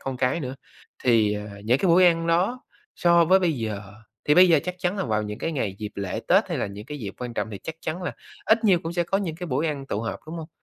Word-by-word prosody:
con 135 -1 -4
cái 125 +6 0
nữa, 130 -2 -4 0.5
thì, 115 -4 +4
ờ, 105 -1 -7
những 125 +4 +3
cái 190 - 0
buổi 175 +2 +6
ăn 165 -1 +2
đó, 185 +10 +1 0.3
so 170 -1 +5
với 185 +3 +5
bây 175 -4 +1
giờ, 110 -6 -4 0.4
thì 150 - +4
bây 180 +1 +8
giờ 165 -3 +6
chắc 180 0 -3
chắn 180 +3 -1
là - - 0
vào 110 -3 0
những 105 0 -6
cái 165 - -2
ngày 105 -9 -2
dịp 105 -1 -5
lễ 100 -2 -3
Tết - - +4
hay - - -2
là - - -1
những 100 +1 -8
cái 150 0 -6
dịp 100 -6 -6
quan 125 -2 -6
trọng 110 - -2
thì 100 - -6
chắc 160 - -5
chắn 180 +3 -4
là - - -3 0.3
ít 225 +1 +3
nhiều 190 -5 +5
cũng 165 +1 -4
sẽ 175 0 0
có 195 +3 0
những 170 -6 -3
cái 180 0 -6
buổi 140 +3 0
ăn 140 -3 -3
tụ 105 - -2
họp, 115 - -4
đúng 160 +2 -6
hông? 160 -1 -7
150 Hz, 290 wpm, -25 LUFS, 110-175 Hz, 0.5 s, bây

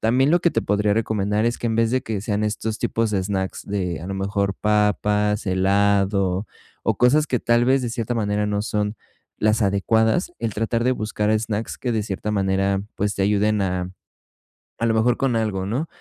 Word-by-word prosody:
También, 130 +5 +3
lo 175 - +4
que 170 - +3
te 115 - +1
podría 105 +1 +1
recomendar 105 -1 0
es 120 - 0
que - - -3
en 110 - -1
vez 115 0 +2
de 130 0 +1
que 110 -5 -3
sean 105 0 -1
estos 110 +1 -2
tipos 115 -1 0
de 95 - +1
snacks 95 -1 -3
de 90 -5 -2
a 85 - -7
lo 100 - -3
mejor, 100 0 -1
papas, 105 0 +1
helado, 100 0 +2 0.4
o - - +1
cosas 145 +5 +4
que 125 - +1
tal 120 0 +3
vez, 135 +2 +3
de 120 - -2
cierta 115 +1 -2
manera, 105 -2 0
no 105 0 -1
son 105 0 -2 0.4
las 110 +1 +2
adecuadas, 110 - +1
el 115 -2 -2
tratar 115 +2 -1
de 125 - +3
buscar 105 -2 -1
snacks 110 0 -4
que 125 - -2
de 110 -2 0
cierta 100 +1 -4
manera, 95 -1 +1
pues, 105 0 -1
te 100 - -1
ayuden 105 +1 +2
a 90 -1 -2 0.9
a 115 - 0
lo 115 - +2
mejor 115 +2 +3
con 135 -3 0
algo, 100 -4 -1
¿no? 130 +11 -2
105 Hz, 200 wpm, -22 LUFS, 100-115 Hz, 0.9 s, lo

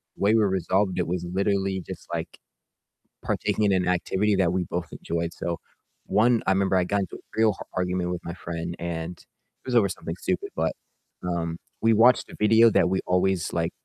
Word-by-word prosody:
the - - -15
way 105 +2 +5
we 110 - +4
resolved 95 0 +1
it 85 - 0
was 90 0 -2
literally 95 +1 0
just, - - -9
like, - - -4 0.9
partaking 105 - 0
in 100 - +3
an 90 -1 +1
activity 95 +3 +1
that 90 -3 +2
we 90 -2 0
both 90 0 -4
enjoyed, 85 0 -3
so 85 0 -3 0.5
one 115 +4 +3
I - - +5
remember 95 0 +1
I 90 - +3
got 100 +2 0
into 95 - -5
a - - -18 0.2
real 110 -1 +5
h - - -7
argument 90 -1 -1
with 90 - -4
my 85 - -4
friend 85 -1 -5
and 85 0 -4
it - - -28
was 125 - -1
over 105 -4 +5
something 85 -2 -5
stupid, 90 0 -2
but, - - 0 0.5
um, 85 -2 -2 0.2
we 115 0 +4
watched 120 +4 +5
a - - -10
video 115 +2 +6
that 90 - +3
we 95 - +1
always, 90 -1 +1
like, - - 0
95 Hz, 205 wpm, -25 LUFS, 85-100 Hz, 0.9 s, video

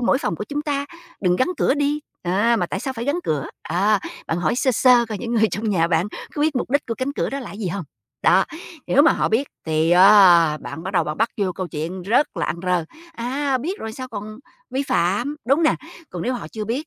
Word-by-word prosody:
mỗi 255 +2 +2
phòng 170 - -2
của - - -4
chúng 295 0 -2
ta 285 -1 -2 0.3
đừng 180 -2 +2
gắn 255 - +1
cửa 275 - +2
đi, 290 +1 0 0.2
à, 205 +7 +2
mà 175 - 0
tại 190 +3 -4
sao 265 - -3
phải 230 -1 -4
gắn 285 +6 0
cửa?" 145 -3 -1 0.2
Á, 195 +5 +1 0.3
bạn 165 - -1
hỏi 170 +2 +1
sơ 260 - +2
sơ 245 0 +5
coi 215 -3 -4
những 240 0 -3
người 220 -1 +4
trong 215 +5 -2
nhà 165 -4 +2
bạn 170 +2 +1 0.3
có 290 - -3
biết 305 -3 +1
mục 245 - -2
đích 285 +2 +1
của 230 - -2
cánh 260 +4 -3
cửa - - -2
đó 275 - -3
là 255 - -8
gì 200 -2 -4
hông. 190 0 -4 0.4
Đó, - - +5 0.4
nếu 285 - +5
mà 330 - +6
họ - - 0
biết 245 +6 +1 0.2
thì, 160 +1 +1
à, 180 -4 +7
bạn 160 - -8
bắt 190 - -4
đầu 170 -3 +2
bạn 150 0 -4
bắt 225 +1 +2
vô 195 -3 0
câu 180 0 -5
chuyện 165 +5 -5
rất 230 +10 +1
là - - -1
ăn 165 - -2
rơ, 180 -2 +1 0.3
a, 265 +2 -1
biết 345 - -4
rồi 220 0 -5
sao 255 +2 -7
còn 215 -1 -7 0.3
vi 265 +2 -1
phạm, 240 - 0
đúng 275 +6 +3
nè? 315 - +4 0.4
Còn 175 - -5
nếu 255 - -1
họ 245 - -6
chưa 215 -1 -5
biết 255 +9 -3
220 Hz, 255 wpm, -22 LUFS, 180-265 Hz, 0.4 s, à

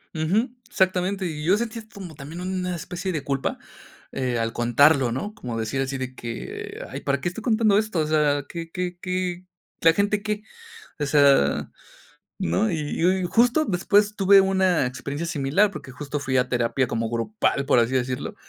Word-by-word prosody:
Ujú. 190 +11 +1 0.2
Exactamente. 190 -2 0
Y 150 -3 -4
yo 190 +4 +4
sentía 230 -1 -4
como 180 -5 -9
también 150 +5 -8
una 180 -1 -2
especie 180 +3 -4
de 150 -4 -3
culpa, 135 -1 -2 0.5
eh, 125 -3 -1
al 115 0 -1
contarlo, 125 +2 +4
¿no? 205 - -4
Como 120 - -5
decir 125 +5 -2
así 135 0 -2
de 130 0 -5
que 115 -1 -7
ay, - - -6
¿para 140 0 -1
qué 175 - 0
estoy 195 +5 -8
contando 220 -3 +3
esto? 215 -5 0
O 155 - +1
sea 150 -2 +2
¿qué 165 -1 -7
qué 180 -1 -3
qué? 180 -1 -3 0.4
¿La 165 0 +6
gente 205 +1 +1
qué? 210 -1 -2 0.6
O 145 - -1
sea, 140 - +4 0.7
¿no? 200 +2 +1
Y 150 -3 -3
yo 180 +3 +4
y 190 -1 -1
justo 245 - +3
después 205 +2 +2
tuve 195 0 +6
una 190 -6 +2
experiencia 140 +6 -4
similar 165 +7 +2
porque 150 -7 -9
justo 145 +1 -5
fui 130 -2 -1
a 125 0 +1
terapia 120 +1 +1
como 115 -1 -2
grupal 140 - 0
por 140 - +4
así 120 +2 +2
decirlo 125 0 -2
165 Hz, 180 wpm, -24 LUFS, 135-190 Hz, 0.7 s, La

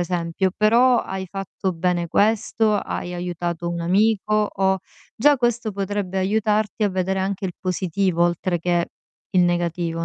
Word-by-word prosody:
esempio, 175 +1 -1
però 235 +3 +4
hai 190 -2 -4
fatto 195 0 -4
bene 175 0 0
questo, 215 +2 +2
hai 180 -3 -3
aiutato 175 -1 -3
un 170 0 -3
amico 210 +3 +2
o" 190 0 +1 0.4
Già 290 +5 +5
questo 240 -2 0
potrebbe 195 -1 -3
aiutarti 210 +1 0
a 205 - +3
vedere 190 0 -1
anche 195 +1 -2
il 180 - -2
positivo 185 -1 0
oltre 175 0 0
che 175 0 0 0.4
il 185 - +3
negativo, 170 -1 -1
190 Hz, 145 wpm, -22 LUFS, 175-210 Hz, 0.4 s, Già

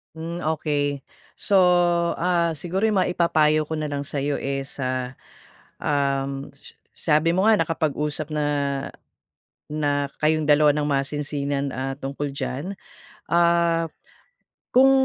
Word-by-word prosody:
Hmm, 170 +2 -5
okey. 145 -2 -1 0.4
So, 205 - 0 0.6
ah, 170 -1 +2
siguro 175 +5 -3
yung 215 -3 +3
maipapayo 155 -4 +2
ko 155 +1 -4
na 155 - -2
lang 145 -1 -3
sa'yo 140 0 -2
is, 135 0 -4
ah, 130 0 -2 0.6
um, 140 -1 -1
s - - -14 0.2
sabi 160 +3 +2
mo 190 - +2
nga 220 -1 +5
nakapag-usap 150 -2 -1
na, 150 -1 0 1.2
na 145 -2 0 0.2
kayong 155 0 +2
dalawa 150 0 +6
ng 145 0 -1
masinsinan, 140 0 -1
ah, 135 +1 -4
tungkol 140 +1 -4
diyan. 150 +7 -5 0.5
Ah, 170 -1 +3 0.8
kung 265 +2 +6
150 Hz, 120 wpm, -24 LUFS, 140-165 Hz, 1.2 s, dalawa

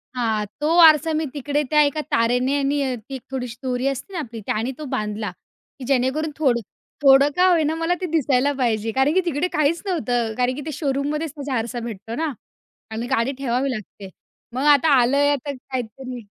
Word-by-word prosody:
हां. 220 -4 0 0.2
तो 320 +3 +2
आरसा 315 0 +6
मी 310 +1 0
तिकडे 290 +1 -1
त्या 300 0 +5
एका 290 +1 0
तारेने 250 +1 +2
आणि 275 -2 0
ती 270 - -5
एक 260 - -7
थोडीशी 250 -3 -4
दोरी 255 0 -1
असते 275 +8 -4
ना 355 - -3
आपली, 235 -6 -6
त्यानी 225 +4 -1
तो 305 - -7
बांधला, 210 0 -3 0.5
की 260 - -7
जेणेकरून 275 +4 0
थोडं 260 -6 +2 0.4
थोडं 275 0 +6
का 365 +1 +4
होईना 320 -3 +2
मला 330 +2 0
ते - - -1
दिसायला 285 -3 +2
पाहिजे, 225 -4 0
कारण 265 +5 +2
की 375 - +3
तिकडे 330 +1 0
काहीच 305 +2 +1
नव्हतं. 245 - -1
कारण 250 +1 +1
की 295 - -6
ते 315 - -4
शोरूममध्येच 290 +2 -2
तसा 275 -3 -2
आरसा 235 +2 -3
भेटतो 225 -1 -6
ना 315 +1 -1 0.6
आणि 225 +2 -4
गाडी 260 0 +1
ठेवावी 265 0 -1
लागते. 210 -3 -8 0.4
मग 260 +2 -2
आता 290 +3 +3
आलं 250 +4 +2
आहे 285 0 +4
आता 285 0 -2
काहीतरी 255 -1 -6
270 Hz, 190 wpm, -22 LUFS, 245-300 Hz, 0.6 s, आरसा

